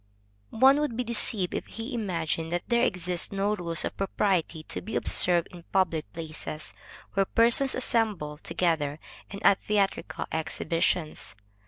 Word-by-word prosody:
_ 225 - -7
One 270 +3 +7
would 295 -6 -1
be 250 - 0
deceived 225 -5 -1
if - - -3
he 230 +4 -6
imagined 165 -7 -2
that 175 0 -1
there 235 -1 +3
exist 180 -7 0
no 200 +1 0
rules 170 -4 0
of - - -4
propriety 185 -5 0
to - - -5
be 220 - -6
observed 175 -2 +4
in 175 - -11
public 170 -5 +1
places, 155 -2 -7 0.4
where 195 0 +2
persons 240 +4 +3
assemble 210 -12 0
together, 160 -5 0 0.3
and 200 - -7
at 195 - +5
theatrical 205 -2 -1
exhibitions. 160 0 -1
185 Hz, 150 wpm, -27 LUFS, 165-225 Hz, 0.4 s, One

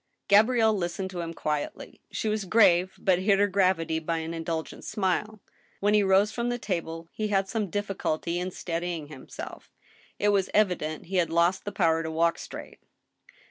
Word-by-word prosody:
Gabrielle 220 +2 +5
listened 190 0 -3
to 180 - -5
him 165 -1 -4
quietly. 150 -2 -4
She - - -3
was 215 -2 -1
grave, 185 -3 +4
but 185 -2 +2
hid 195 +1 +3
her 205 - +4
gravity 185 -5 +1
by 165 +1 -2
an 160 +1 -4
indulgent 165 -1 -4
smile. 210 +1 -1 0.4
When 205 +1 +2
he 210 - +5
rose 195 +2 +4
from 235 +1 -2
table 165 -6 -4
he 215 - -2
had 195 -2 +1
some 210 -2 -2
difficulty 175 -4 -2
in 180 +1 -2
steadying 170 -3 -4
himself. 135 -4 -9 0.5
It 205 - +2
was 195 -2 +2
evident 180 -7 +1
he 190 +2 -2
had 175 -2 +2
lost 170 +3 +2
the 205 - -3
power 165 -4 +2
to 160 - -4
walk 165 +1 +1
straight. - - -9
185 Hz, 175 wpm, -27 LUFS, 165-205 Hz, 0.5 s, Gabrielle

